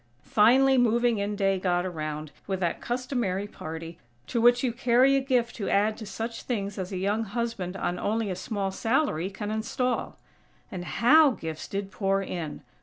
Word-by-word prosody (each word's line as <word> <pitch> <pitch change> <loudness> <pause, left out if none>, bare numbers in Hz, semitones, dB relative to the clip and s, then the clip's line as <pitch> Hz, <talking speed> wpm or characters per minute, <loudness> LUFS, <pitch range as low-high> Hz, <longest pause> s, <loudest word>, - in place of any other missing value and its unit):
Finally 260 +5 +5
"moving 235 -1 +3
in 205 +1 -2
day" 195 -1 +1
got 180 -1 +1
around, 155 -3 -4 0.2
with 190 -2 -2
that 175 -3 -1
customary 240 -6 -2
party, 165 -3 -8 0.3
to 235 - -1
which 245 +1 +5
you 245 -3 +1
carry 250 +2 +4
a - - +4
gift 250 -3 0
to 205 - -3
add 210 +2 +2
to 215 - -9
such 230 +2 -5
things 200 -5 -3
as 185 0 -4
a 190 - -3
young 205 +4 0
husband 220 -4 -3
on 175 -1 -2
only 220 -1 -1
a - - -2
small 200 -1 -3
salary 210 - 0
can 205 +2 -5
install. 240 +3 -2 0.5
And 180 -1 -5
how 295 - +5
gifts 160 -1 -5
did 195 0 -4
pour 195 -1 +1
in!! 170 -5 -5
205 Hz, 180 wpm, -27 LUFS, 185-240 Hz, 0.5 s, Finally